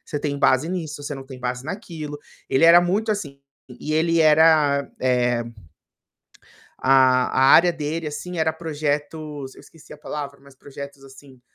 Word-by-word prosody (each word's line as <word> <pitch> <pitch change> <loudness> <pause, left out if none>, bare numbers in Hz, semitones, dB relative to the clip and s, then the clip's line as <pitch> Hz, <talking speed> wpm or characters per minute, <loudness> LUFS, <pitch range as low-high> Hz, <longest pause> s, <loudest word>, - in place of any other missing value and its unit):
você 145 - -4
tem 145 -1 -3
base 140 +3 +2
nisso, 160 -5 -5
você 145 0 -5
não 135 - -8
tem 130 -2 -10
base 125 +1 -4
naquilo". 155 -5 -7 0.3
Ele 135 +5 +3
era 170 +1 +8
muito 205 +5 0
assim, 145 -9 -6 0.3
e 150 +4 -7
ele 165 +1 +2
era, 155 -2 +4
eh 125 -2 +1 1.3
A 130 -1 +4 0.2
a - - +7
área 175 +1 +6
dele, 160 0 -4
assim, 175 +4 -6
era 160 0 +1
projetos, 150 -2 -4
eu - - -15
esqueci 160 -2 -17
a 150 - -12
palavra, 140 -2 -7
mas 140 -1 -18
projetos 140 0 -11
assim, 135 -1 -16
145 Hz, 160 wpm, -22 LUFS, 135-160 Hz, 1.3 s, era